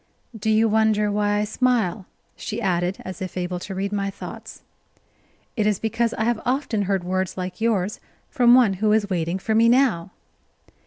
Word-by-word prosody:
"Do 220 0 -2
you 220 +1 +4
wonder 215 -1 +2
why 205 0 +1
I 210 - +1
smile?" 215 -4 0 0.3
she 210 - -5
added, 180 -3 0
as 185 -1 -7
if 185 0 -5
able 180 0 -3
to 190 +1 -7
read 195 +1 -2
my 200 -1 -1
thoughts. 195 - -10 0.9
"It 215 -3 +1
is 210 -2 +2
because 230 +2 -1
I 220 - -1
have 235 -1 0
often 255 -4 -1
heard 195 -3 0
words 185 +1 -2
like 180 +1 -5
yours 210 -3 0 0.3
from 245 -1 +5
one 240 -6 +5
who 215 -1 +3
is 205 -2 +1
waiting 170 0 -1
for 220 +3 -2
me 230 +1 +5
now." 235 -9 +2
210 Hz, 180 wpm, -23 LUFS, 185-225 Hz, 0.9 s, from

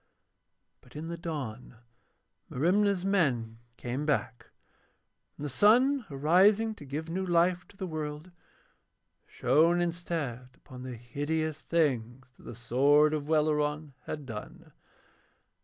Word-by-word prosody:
But 125 - -20
in 160 +2 -6
the 170 - -3
dawn 135 -9 -6 0.7
Merimna's 190 +6 +1
men 125 - 0 0.2
came 125 +4 -4
back, 140 -5 -1 0.9
and 150 - -6
the - - -1
sun 235 - +4
arising 190 +10 +3
to 150 - -12
give 150 +4 -5
new 180 +3 -2
life 175 0 +2
to 195 - -20
the 190 - -4
world, 155 0 -5 1.0
shone 165 +3 +3
instead 165 -8 -3
upon 130 -2 -12
the 130 -1 -6
hideous 150 +6 -3
things 130 -6 -1
that - - -19
the 120 - -8
sword 140 +6 +3
of 150 -1 -3
Welleran 150 -1 +1
had 150 -2 -5
done. 110 -4 -9
150 Hz, 125 wpm, -29 LUFS, 130-175 Hz, 1.0 s, sun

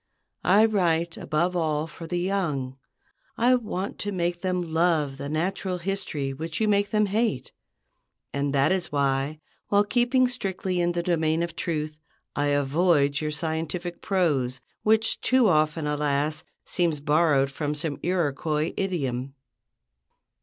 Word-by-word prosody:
I 205 +4 +6
write 170 -6 +1
above 170 +4 -1
all 155 -3 0
for 165 +1 -9
the 175 - -2
young. 170 -9 -1 0.6
I 245 +2 +4
want 210 -6 -2
to 205 - -2
make 175 -2 -1
them 180 -3 -2
love 160 -5 +2
the 140 +1 -5
natural 180 +4 -1
history 170 -7 -3
which 160 +4 -5
you 220 - +2
make 205 -1 +2
them 215 -1 +2
hate; 205 - -1 0.8
and 140 0 0
that 140 +4 +3
is 190 -2 -1
why, 140 +1 0 0.3
while 205 0 +4
keeping 245 +4 +2
strictly 190 -6 -2
in 175 0 +1
the 170 0 -1
domain 160 -1 +1
of 170 -1 -5
truth, 155 -2 -3 0.4
I 145 - +1
avoid 145 0 +2
your 155 - -1
scientific 165 +3 -3
prose, 145 -10 0 0.2
which 220 +1 +2
too 255 -3 +4
often, 155 -2 +2
alas, 150 0 0 0.2
seems 170 -5 0
borrowed 145 -2 +3
from 150 +1 -2
some 150 -1 -3
Iroquois 155 -2 0
idiom. 135 -8 -2
165 Hz, 140 wpm, -26 LUFS, 150-185 Hz, 0.8 s, I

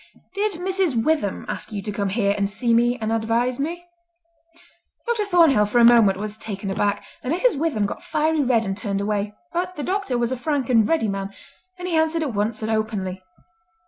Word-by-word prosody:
"Did 410 +1 0
Mrs. 360 -8 0
Witham 300 -10 0
ask - - -5
you 205 -2 -4
to 210 - -3
come 200 -1 -2
here 200 0 +1
and 200 -1 0
see 230 +3 0
me 240 +1 +3
and 220 0 -2
advise 230 +3 0
me?" 340 +5 -3 1.2
Dr. 465 -3 0
Thornhill 325 - +4
for 210 - 0
a 240 - +6
moment 230 -5 +6
was 210 +1 -5
taken 200 -3 -5
aback, 205 +1 -1 0.2
and 255 - -3
Mrs. 410 +8 +2
Witham 290 -10 0
got - - -5
fiery 310 0 0
red 245 -4 +2
and 195 0 -2
turned 200 -2 -3
away; 205 0 -2 0.2
but 365 +1 -2
the 295 - -4
doctor 375 -9 -1
was 240 0 0
a 260 - -1
frank 275 -2 -1
and 225 -3 +4
ready 320 -9 +2
man, 195 -1 -3 0.5
and 360 0 -5
he 345 - -1
answered 320 +1 +2
at 275 -6 -3
once 215 +2 -1
and 220 - -1
openly. 205 -4 -2
235 Hz, 205 wpm, -23 LUFS, 210-320 Hz, 1.2 s, a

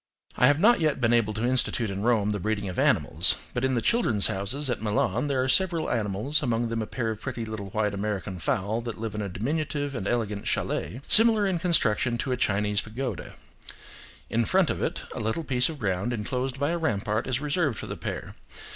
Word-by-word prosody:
I 125 - +5
have 145 +2 +3
not 235 +6 +5
yet 155 -3 +1
been 120 -1 +2
able 115 -3 +3
to 110 - -2
institute 125 -3 +1
in 100 0 -4
Rome 110 -2 +2
the 105 - -2
breeding 105 0 -2
of 90 - -4
animals, - - +3 0.2
but 125 - -2
in 130 -1 +1
the 115 - 0
"Children's 175 - +3
Houses" 125 +10 -2
at 120 -4 -2
Milan 110 +4 0
there 135 -2 +1
are - - -1
several 170 +2 +1
animals, 110 +6 +1
among 120 -3 0
them 115 0 -2
a 110 - -4
pair 115 -3 -2
of 110 -1 -7
pretty 120 -4 -4
little 110 -3 -6
white 105 0 -1
American 100 -2 -3
fowl 110 +2 -1
that 115 -1 -6
live 110 -1 -4
in 105 - -3
a 100 - -3
diminutive 145 - -2
and 110 -6 -4
elegant 105 -4 -2
chalet, 125 - -2
similar 220 -2 +5
in 185 -3 0
construction 125 - +2
to 130 - -3
a - - +2
Chinese 105 -2 +1
pagoda: 125 +4 -5 0.9
in 115 +1 +1
front 185 - +2
of - - -4
it, - - -2
a - - -5
little 110 +9 -2
piece 125 -2 +2
of 160 - -6
ground 100 +1 -1
inclosed 125 +4 -3
by 145 +3 +1
a 170 - -1
rampart 110 -5 -1
is 130 -1 0
reserved 145 - 0
for - - -5
the - - -5
pair. - - -6
120 Hz, 220 wpm, -26 LUFS, 105-140 Hz, 0.9 s, I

